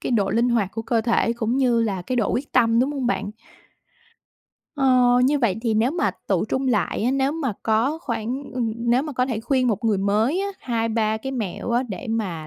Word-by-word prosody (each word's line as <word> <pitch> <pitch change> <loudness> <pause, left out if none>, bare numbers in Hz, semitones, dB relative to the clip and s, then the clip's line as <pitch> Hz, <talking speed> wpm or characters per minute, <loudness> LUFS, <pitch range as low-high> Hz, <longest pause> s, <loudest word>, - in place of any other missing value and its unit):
cái - - -2
độ 200 -4 +1
linh 230 +4 +2
hoạt 230 -6 +1
của 225 - -4
cơ 230 0 +1
thể 230 0 +1
cũng 235 +1 -1
như 245 -4 +2
là 195 -5 -2
cái 250 +8 -3
độ 225 -5 +1
quyết 275 +3 -3
tâm, 230 -2 +4
đúng 270 +4 +1
hông 270 -4 -2
bạn? 205 -4 -1 1.5
Ờ. 250 -2 +4
Như 290 +3 +2
vậy 225 -7 +1
thì 225 -2 0
nếu 225 +4 +2
mà 345 +4 0 0.2
tựu - - +1
trung 265 +1 -2
lại 215 -3 0
á, 245 - +2
nếu 270 +1 +1
mà 295 -7 -2
có 230 +8 +1
khoảng, 250 -1 -3
ừm 240 -3 -1
nếu 240 +2 +1
mà 300 0 -5
có 250 -1 0
thể 230 -4 -3
khuyên 255 0 +1
một 220 +1 -1
người 215 -3 +2
mới 215 - +1
á, 400 - -1
2-3 225 -2 0
cái 265 +5 -5
mẹo 225 -3 -4
á, 240 +2 +2
để 210 +5 -6
mà 185 -9 -3
235 Hz, 225 wpm, -23 LUFS, 220-260 Hz, 1.5 s, tâm